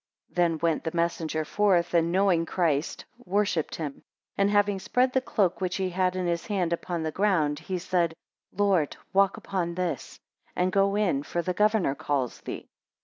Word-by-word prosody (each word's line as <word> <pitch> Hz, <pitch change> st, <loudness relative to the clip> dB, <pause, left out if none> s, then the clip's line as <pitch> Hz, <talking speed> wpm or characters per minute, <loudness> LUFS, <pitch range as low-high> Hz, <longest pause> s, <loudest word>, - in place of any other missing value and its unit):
9 -, -, -29 dB
Then 170 Hz, -2 st, +2 dB
went 165 Hz, -2 st, +1 dB
the 160 Hz, 0 st, -4 dB
messenger 165 Hz, -2 st, -1 dB
forth, 185 Hz, -2 st, +2 dB
and 170 Hz, 0 st, +3 dB
knowing 185 Hz, -2 st, +3 dB
Christ, 160 Hz, -5 st, 0 dB, 0.2 s
worshipped 190 Hz, -5 st, 0 dB
him; 150 Hz, -4 st, -5 dB, 0.3 s
and 200 Hz, 0 st, +2 dB
having 205 Hz, -1 st, +2 dB
spread 250 Hz, +6 st, +1 dB
the 260 Hz, -, +2 dB
cloak 195 Hz, -8 st, 0 dB
which 185 Hz, 0 st, -1 dB
he 190 Hz, -1 st, -1 dB
had 185 Hz, 0 st, +1 dB
in 185 Hz, -1 st, -1 dB
his 170 Hz, -1 st, -1 dB
hand 185 Hz, -5 st, 0 dB
upon 170 Hz, -1 st, -3 dB
the 160 Hz, -, -2 dB
ground, 160 Hz, -7 st, +1 dB
he 185 Hz, +3 st, -4 dB
said, 175 Hz, -2 st, 0 dB, 0.4 s
Lord, 190 Hz, -6 st, +1 dB, 0.2 s
walk 195 Hz, 0 st, +3 dB
upon 175 Hz, -3 st, -3 dB
this, 180 Hz, -1 st, -3 dB, 0.4 s
and 180 Hz, +1 st, +1 dB
go 195 Hz, +1 st, +2 dB
in, 190 Hz, -10 st, +1 dB
for 170 Hz, +4 st, -3 dB
the 180 Hz, -, -1 dB
governor 210 Hz, -6 st, +2 dB
calls 135 Hz, -3 st, -2 dB
thee. -, -, -7 dB
180 Hz, 180 wpm, -27 LUFS, 165-195 Hz, 0.4 s, and